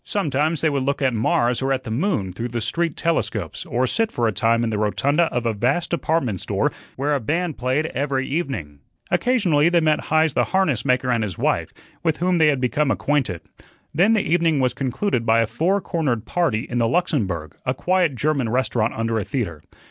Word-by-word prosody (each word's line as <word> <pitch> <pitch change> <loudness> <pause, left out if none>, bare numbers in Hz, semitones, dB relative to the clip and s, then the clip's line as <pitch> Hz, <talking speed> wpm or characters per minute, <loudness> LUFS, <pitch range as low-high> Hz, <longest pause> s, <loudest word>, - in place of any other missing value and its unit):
Sometimes 155 -4 0
they 160 - +3
would 140 -1 0
look 140 +2 -1
at 135 -3 +1
Mars 120 +2 +1
or 135 +1 0
at 130 -1 0
the 110 - -6
moon 125 - -1
through 115 +6 -4
the 120 0 -3
street 170 +7 -1
telescopes 115 - -2
or 125 +2 0
sit 225 - 0
for 120 -1 0
a - - +1
time 115 +3 +1
in 115 - -1
the 105 - -1
rotunda 140 +10 +2
of 120 -6 -2
a 115 - +1
vast 130 +11 0
department 155 - 0
store - - 0 0.2
where 145 +3 0
a 140 - +1
band 160 +7 -2
played 130 +5 0
every 135 -3 -2
evening. 135 - -3 0.3
Occasionally 180 - +3
they 175 0 +3
met 155 -2 +1
Heise 155 -1 +2
the - - +2
harness 160 - +1
maker 125 -1 +1
and 115 -2 +1
his 95 -5 -4
wife, - - 0 0.3
with 160 -2 0
whom 180 0 +1
they 160 - +5
had 145 -3 +2
become 135 +3 +1
acquainted. 130 - 0 0.5
Then 195 +8 +4
the 215 - +2
evening 165 -2 +2
was 130 -1 +1
concluded 130 - -1
by 115 0 +3
a - - +2
four 180 - 0
cornered 145 - -2
party 150 -12 0
in 120 - -2
the 115 - +2
Luxembourg, 110 - -1
a 130 - -1
quiet 180 -2 +1
German 140 -2 0
restaurant 120 -2 0
under 115 0 -1
a - - -2
theatre. 100 - -3
135 Hz, 210 wpm, -22 LUFS, 115-160 Hz, 0.5 s, they